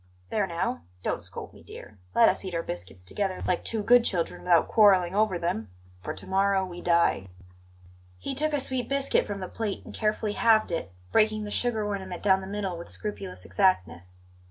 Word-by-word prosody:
There 205 -3 +1
now, 170 -6 -2 0.2
don't - - -1
scold - - -8
me, - - -15
dear! 105 -1 -12 0.2
Let - - +7
us - - +1
eat 185 -2 -5
our 165 - -1
biscuits 90 +1 -7
together, 190 - -3
like 180 - 0
two 220 -2 -1
good 245 +2 +6
children, 175 -7 -1
without 175 -2 +4
quarrelling 190 -5 +5
over 205 -3 +2
them 140 - -2 0.3
for - - -4
to - - -9
morrow 195 0 +2
we 175 -1 -8
die." 170 - +2 0.9
He 180 - -4
took 305 +3 +2
a 290 - +2
sweet 260 -3 -1
biscuit 275 0 +1
from 200 -2 -5
the 185 - -4
plate 215 -1 -4
and - - -10
carefully 215 -1 -1
halved 220 -4 +3
it, 165 - -3 0.2
breaking 215 0 +3
the 210 - -6
sugar 225 -3 0
ornament 190 -3 -4
down 190 -1 +4
the 190 - -8
middle 195 -3 -3
with 170 - -9
scrupulous 200 -3 -6
exactness. 90 - 0
190 Hz, 195 wpm, -27 LUFS, 170-215 Hz, 0.9 s, Let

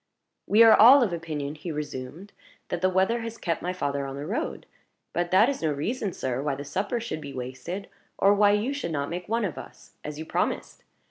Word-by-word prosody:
"We 220 +3 +6
are 225 -1 +8
all 250 +5 +8
of 200 -7 -1
opinion," 155 -4 -4
he 155 +3 -6
resumed, 150 +5 -6 0.4
"that 175 - -3
the 185 - +3
weather 190 +6 +1
has 230 0 -6
kept 165 -6 -2
my 180 - -2
father 140 -6 -2
on 135 - -6
the 140 +1 -5
road. 205 +9 -3 0.5
But 175 0 -1
that 190 +6 +5
is 280 -1 -2
no 160 -2 +1
reason, 200 - -2
sir, 130 -5 -3
why 145 -1 -1
the 140 +1 -7
supper 195 - -2
should 225 -9 -5
be 140 - -8
wasted, 130 +10 -6 0.3
or 200 +1 +5
why 205 0 +4
you 220 +7 0
should 285 - -4
not 145 -1 -2
make 175 +2 -5
one 230 -1 +1
of 170 - -4
us, - - -13
as 150 0 -6
you 160 - -6
promised. - - -2
175 Hz, 220 wpm, -26 LUFS, 145-210 Hz, 0.5 s, are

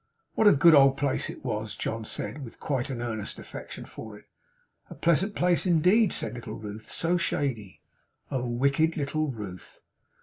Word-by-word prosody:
'What 220 - +4
a - - +9
good 160 +4 +6
old 135 -2 +6
place 140 -2 0
it - - -9
was!' 110 -3 -3
John 110 0 -3
said. 120 +7 -5
With 115 - -11
quite 135 -1 -2
an 120 -3 -4
earnest 110 -3 -4
affection - - -8
for 110 -2 -9
it. - - -18 0.6
'A - - -9
pleasant 175 +5 +1
place 180 +1 +2
indeed,' 180 +5 +4
said 110 - -3
little 120 -3 -7
Ruth. 110 0 -8
'So 170 +2 +1
shady!' 120 - -2 0.5
Oh 130 -2 -1
wicked 140 +7 +1
little 155 +1 -1
Ruth! 90 - -8
135 Hz, 170 wpm, -27 LUFS, 110-160 Hz, 0.6 s, a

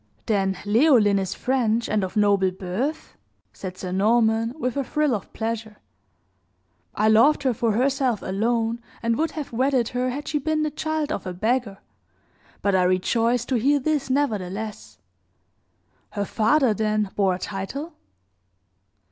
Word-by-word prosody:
"Then 195 -3 0
Leoline 215 -3 +4
is 190 -1 -3
French 235 -3 0
and 210 -2 0
of 190 +2 -4
noble 200 -2 +3
birth?" 195 - -4 0.4
said 185 -1 -7
Sir 185 -1 -5
Norman, 220 +3 +2
with 250 -5 -2
a 280 - 0
thrill 300 0 0
of 205 - -4
pleasure. 225 -1 -4 1.2
"I 215 - +2
loved 230 +8 +5
her 260 -2 +2
for 230 -1 0
herself 255 -1 +1
alone, 230 +4 -1 0.2
and 230 0 +1
would 320 +6 0
have 295 - -5
wedded 255 -1 +1
her 250 +1 -1
had 285 +4 -5
she 300 - 0
been 310 +2 0
the 305 - -1
child 310 0 -2
of 210 - -4
a 180 - -4
beggar; 220 +1 -1 0.9
but 200 0 +2
I 190 - +4
rejoice 230 +7 +1
to 255 - 0
hear 285 +5 +3
this 290 -1 -1
nevertheless. 215 -6 -2 1.2
Her 205 -1 -2
father, 230 +4 +2
then, 215 -1 0
bore 195 -3 +2
a - - -8
title?" 210 - -5
230 Hz, 150 wpm, -24 LUFS, 205-265 Hz, 1.2 s, loved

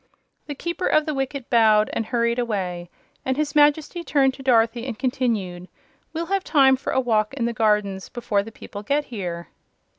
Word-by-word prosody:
The 290 - -5
Keeper 340 +5 -3
of 310 - +3
the 305 - -2
Wicket 270 -1 -3
bowed 215 -2 +4
and 225 - -2
hurried 235 0 0
away, 185 -7 -3 0.3
and 260 0 -1
his 300 -1 -1
Majesty 300 +3 +3
turned 270 -5 +2
to 270 - -11
Dorothy 235 -1 +2
and 235 -4 -5
continued: 215 -9 -2 0.4
"We'll 335 +1 -3
have 390 +2 -1
time 270 -3 +5
for 260 - -4
a - - +2
walk 225 -1 +1
in 240 -4 -1
the 235 - -1
gardens 210 -3 0
before 225 -5 -1
the 220 +3 -9
people 205 -1 -9
get 285 +7 0
here." 175 -8 -6
240 Hz, 185 wpm, -23 LUFS, 215-280 Hz, 0.4 s, time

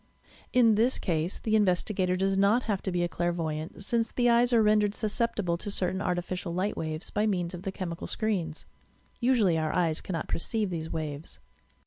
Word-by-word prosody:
In 235 -3 +5
this 230 +5 +2
case 165 0 -1
the 220 -1 0
investigator 185 -2 +2
does 195 +1 +1
not 200 +5 +3
have 205 -4 -1
to 190 - -3
be 175 -1 0
a - - +1
clairvoy 170 -2 -1
ant, 160 +5 -7
since 230 +1 0
the 245 -1 +3
eyes 240 +1 +4
are 230 -2 +5
rendered 210 -1 +3
susceptible 215 -5 -1
to 205 - -5
certain 190 -1 -1
ar 180 -2 0
tificial 175 0 -4
light 190 +3 -1
waves 155 +1 -4
by 210 +1 +1
means 180 -4 -1
of 175 - -6
the 195 0 -3
chemical 175 -3 -5
screens. 180 -8 -2 0.5
Usually 230 -10 +3
our 155 -1 -1
eyes 165 -3 +1
cannot 165 -4 -4
perceive 210 +2 0
these 160 -2 -4
waves. 150 - -5
185 Hz, 190 wpm, -28 LUFS, 170-215 Hz, 0.5 s, In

